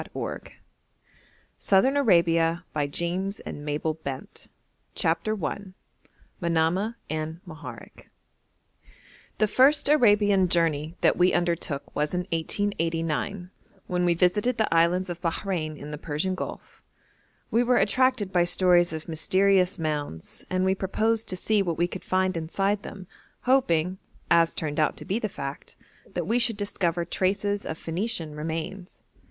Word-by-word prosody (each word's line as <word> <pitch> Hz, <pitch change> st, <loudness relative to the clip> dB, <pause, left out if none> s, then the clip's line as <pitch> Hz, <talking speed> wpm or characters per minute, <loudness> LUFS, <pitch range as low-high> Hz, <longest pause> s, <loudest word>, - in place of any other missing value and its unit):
] -, -, -20 dB, 1.5 s
SOUTHERN 205 Hz, +8 st, +3 dB
ARABIA 170 Hz, -, +3 dB, 2.3 s
CHAPTER 170 Hz, +3 st, 0 dB
I -, -, -1 dB, 0.8 s
MANAMAH 170 Hz, +6 st, +1 dB, 0.2 s
AND 155 Hz, +1 st, -3 dB
MOHAREK 160 Hz, -3 st, -11 dB, 1.3 s
The 215 Hz, -, +3 dB
first 270 Hz, +8 st, +4 dB
Arabian 205 Hz, -9 st, +4 dB
journey 165 Hz, -2 st, 0 dB
that -, -, +3 dB
we 180 Hz, +1 st, +4 dB
undertook 170 Hz, -5 st, -1 dB
was 150 Hz, +3 st, 0 dB
in 180 Hz, -, +1 dB
1889, 165 Hz, +1 st, -1 dB, 0.3 s
when 180 Hz, -1 st, -1 dB
we 175 Hz, -1 st, +3 dB
visited 205 Hz, +8 st, +2 dB
the 220 Hz, -6 st, +1 dB
Islands 175 Hz, +2 st, +2 dB
of 175 Hz, 0 st, -7 dB
Bahrein 165 Hz, -3 st, -2 dB
in 150 Hz, -, -8 dB
the 150 Hz, -, -6 dB
Persian 155 Hz, +5 st, -2 dB
Gulf; 185 Hz, -, -7 dB, 0.7 s
we 230 Hz, -, +3 dB
were 245 Hz, 0 st, +3 dB
attracted 215 Hz, 0 st, +2 dB
by 175 Hz, -1 st, +4 dB
stories 175 Hz, -1 st, +3 dB
of 160 Hz, -1 st, -6 dB
mysterious 185 Hz, +3 st, +2 dB
mounds, 150 Hz, -, -4 dB
and 185 Hz, 0 st, +1 dB
we 190 Hz, -, +3 dB
proposed 220 Hz, +4 st, 0 dB
to 185 Hz, -, -1 dB
see 210 Hz, +2 st, +2 dB
what 170 Hz, -4 st, -1 dB
we 170 Hz, -, +3 dB
could 185 Hz, -, -8 dB
find 185 Hz, 0 st, +1 dB
inside 195 Hz, +5 st, -1 dB
them, 195 Hz, -2 st, -9 dB, 0.4 s
hoping, 185 Hz, -9 st, +2 dB, 0.3 s
as 170 Hz, -1 st, +4 dB
turned 150 Hz, -1 st, -2 dB
out 155 Hz, -, +1 dB
to -, -, -7 dB
be 200 Hz, +4 st, -1 dB
the 215 Hz, -, -2 dB
fact, 140 Hz, -5 st, -7 dB, 0.4 s
that -, -, -3 dB
we 235 Hz, +2 st, +2 dB
should 235 Hz, -3 st, 0 dB
discover 175 Hz, -4 st, -1 dB
traces 200 Hz, +3 st, -1 dB
of 160 Hz, -, -4 dB
Phoenician 170 Hz, -2 st, -3 dB
remains. 165 Hz, +5 st, -5 dB
180 Hz, 130 wpm, -26 LUFS, 165-205 Hz, 2.3 s, first